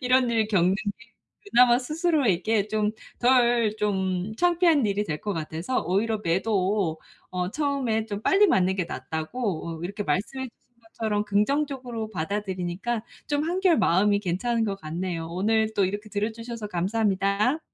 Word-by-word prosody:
이런 250 -1 +3
일 225 -2 +2
겪는 185 -2 +3
게 205 -1 -6 0.4
그나마 240 0 +6
스스로에게 250 - +1
좀 215 0 0 0.3
덜 240 -3 +3
좀 190 -2 -1
창피한 340 - +3
일이 205 +1 0
될 150 -5 -4
것 205 - -2
같아서 165 +7 -2
오히려 215 +5 0
매도 185 -1 0 0.3
어 180 0 -2
처음에 265 -6 -1
좀 205 -2 -4
빨리 405 +2 +5
맞는 190 - +2
게 185 - 0
낫다고 165 - -4
으 - - -5
이렇게 200 +3 -4
말씀해 235 - -2
주신 235 - -31
것처럼 220 -2 -2
긍정적으로 245 +1 -1
받아들이니까 190 +4 -3 0.2
좀 290 0 0
한결 355 0 +2
마음이 200 +4 +3
괜찮은 225 +5 0
것 200 -2 -2
같네요. 165 +1 -4
오늘 220 +5 +1
또 200 - +3
이렇게 205 +3 -3
들어 210 +1 -1
주셔서 230 -1 -7
감사합니다. 200 - +1
210 Hz, 330 characters per minute, -26 LUFS, 185-240 Hz, 0.4 s, 그나마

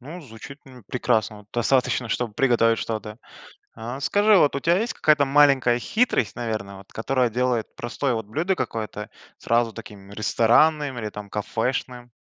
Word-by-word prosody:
Ну, 155 +8 -9
звучит, 140 +1 -12
ну, 130 -3 -15
прекрасно, 110 -1 -1
вот 105 0 -18
достаточно, 125 0 +1
чтобы 115 0 -2
приготовить 115 -3 +3
что-то. 110 0 -5 0.6
А 120 +4 -7
скажи, 205 +6 +4
вот 145 -4 +3
у - - -1
тебя 170 +5 +2
есть 230 +3 -2
какая-то 150 -2 +3
маленькая 135 -4 +4
хитрость, 170 - 0
наверно, 110 -5 -4
вот 95 - -16
которая 125 +2 0
делает 120 -1 -1
простое 125 +2 -2
вот 110 -2 -3
блюдо 165 - -1
какое-то 110 - -5 0.3
сразу 115 -1 +1
таким, 100 -3 -11
ресторанным 130 +7 +2
или, 105 -1 -4
там, 105 -1 -9
кафешным? 120 +3 -3
120 Hz, 155 wpm, -23 LUFS, 110-140 Hz, 0.6 s, скажи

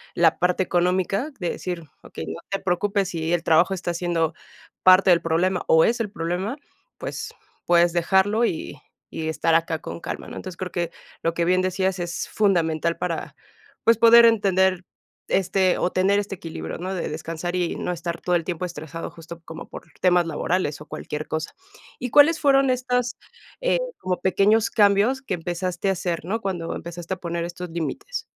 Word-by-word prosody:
la - - +4
parte 180 +1 +2
económica, 185 - 0
de 175 -3 -1
decir: 175 -2 -5 0.2
"Okey, 80 - -7
no 80 +1 -6
te 195 - -1
preocupes, 195 +2 0
si 165 -2 -3
el 175 -1 +1
trabajo 170 +4 +4
está 175 -2 -3
siendo 170 -2 0 0.5
parte 185 0 +7
del 170 -1 +5
problema 175 +3 +1
o 160 0 +6
es 235 0 +1
el 210 -3 -3
problema, 180 - -3 0.4
pues - - -6 0.3
puedes 175 0 +4
dejarlo 190 +6 +2
y 160 -7 -2 0.3
y 160 0 -3
estar 160 +1 +1
acá 165 -1 +1
con 85 -7 -7
calma", - - -5
¿no?, - - -9
entonces, 185 -2 -7
creo 185 -1 -5
que 170 -2 -2 0.3
lo 165 - +1
que 170 0 0
bien 185 +1 +3
decías 185 0 0
es 175 0 -3
fundamental 170 -5 +1
para, 175 -2 -4 0.5
pues, 230 -1 +5
poder 235 +1 +8
entender 190 -5 +3 0.5
este 190 -1 +2
o 180 - 0
tener 195 +2 +3
este 200 -1 -4
equilibrio, 165 -3 -6
¿no?, 185 +3 -4
de 180 - -3
descansar 165 +3 -4
y 175 -2 -1
no - - -3
estar 170 0 -4
todo 180 - +1
el 170 - +1
tiempo 180 +1 -3
estresado 165 -1 -6
justo 170 0 -11
como 160 0 -9
por - - -10
temas 180 -2 +3
laborales 165 -1 -1
o - - -9
cualquier 150 +1 -6
cosa. 155 +1 -4 0.4
¿Y 250 - -3
cuáles 305 +2 +6
fueron 275 -2 +4
estas, 250 -1 0 0.4
eh, - - +2 0.2
como 185 -1 -2
pequeños 210 +4 +3
cambios 210 +5 +3
que 265 - -3
empezaste 175 +2 -2
a 195 - +3
hacer, 175 -2 -3
¿no?, 215 +6 -1
cuando 180 -5 -3
empezaste 170 +1 -6
a - - -17
poner 170 -1 -3
estos 175 +1 -7
límites? 455 - -4
180 Hz, 180 wpm, -24 LUFS, 170-195 Hz, 0.5 s, poder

